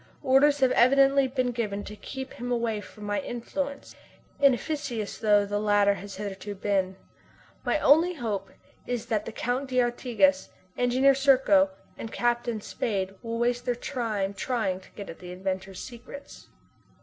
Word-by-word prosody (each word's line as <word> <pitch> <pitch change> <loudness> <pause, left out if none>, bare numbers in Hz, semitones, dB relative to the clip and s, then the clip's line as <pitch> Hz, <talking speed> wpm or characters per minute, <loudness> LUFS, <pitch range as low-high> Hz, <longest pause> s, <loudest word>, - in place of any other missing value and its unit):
Orders 280 +2 +4
have 260 -1 +4
evidently 275 +2 +5
been 255 -1 -1
given 210 -4 -3
to 210 - -8
keep 265 +4 -7
him 245 +1 -5
away 230 -3 0
from 210 - -13
my 205 0 -1
influence, 280 +2 -5 0.4
inefficacious 275 -4 0
though 205 -2 +4
the 205 +1 -2
latter 205 -1 +3
has 200 0 -8
hitherto 200 0 -6
been. 190 -1 0 0.7
My - - +1
only 335 +5 +4
hope 210 -8 -3 0.4
is 245 -2 -2
that 215 -3 -1
the - - -5
Count 250 +4 -2
d'Artigas, 240 -6 +2 0.3
Engineer 255 +3 +4
Serko, 275 +2 +4 0.3
and 225 - -6
Captain 240 -2 0
Spade 195 -3 -2
will 230 0 -4
waste 245 +1 0
their 245 - +1
time 220 -6 -2
trying 200 -4 -1
to 190 - -18
get 200 - -7
at 165 - -9
the 180 -1 -9
inventor's 190 +1 -4
secrets. 260 +3 -11
235 Hz, 150 wpm, -27 LUFS, 205-260 Hz, 0.7 s, evidently